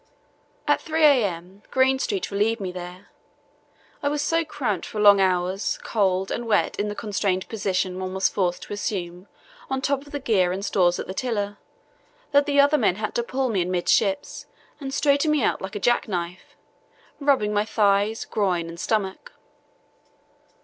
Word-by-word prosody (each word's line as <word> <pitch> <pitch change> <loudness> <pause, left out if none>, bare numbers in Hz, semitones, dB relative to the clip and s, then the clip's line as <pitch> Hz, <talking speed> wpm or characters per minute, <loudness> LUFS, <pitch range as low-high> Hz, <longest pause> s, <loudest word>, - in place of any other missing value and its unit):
At - - +3
3 320 0 -1
a.m. 200 - +1
Greenstreet 265 - +1
relieved 215 +3 +1
me 190 -2 -4
there. 180 +1 -9 0.9
I 285 - +1
was 290 0 -1
so 330 +2 +1
cramped 255 - -3
from 210 -1 -3
long 200 -1 +7
hours, 185 +1 0
cold, 190 -3 0
and 235 - -3
wet, 210 -2 +1
in 205 - 0
the 205 - -4
constrained 200 -3 -1
position 190 -3 -1
one 185 0 -4
was 190 - +3
forced 180 -3 -1
to - - -7
assume 185 -3 -4 0.4
on 265 - -1
top 275 +1 -1
of - - -14
the 290 - -3
gear 205 -9 +2
and 195 +2 -3
stores 175 -4 +2
at - - -4
the 190 - -6
tiller, 205 -3 -2 0.7
that 285 0 +4
the 285 -1 +2
other 285 +2 +5
men 180 - +2
had 215 +1 -4
to - - 0
pull 260 +2 -2
me 200 -5 +1
amidships 185 +3 0 0.3
and 270 -2 -5
straighten 285 +2 +2
me 300 -4 +2
out - - 0
like 190 +3 -6
a - - -2
jack 240 +4 +2
knife, 180 -2 -5 0.6
first 285 - -8
rubbing 210 -7 +3
my 205 0 +2
thighs, 210 0 +1
groin, 180 -5 -1
and 170 0 -9
stomach. 215 - -2
205 Hz, 175 wpm, -24 LUFS, 185-265 Hz, 0.9 s, long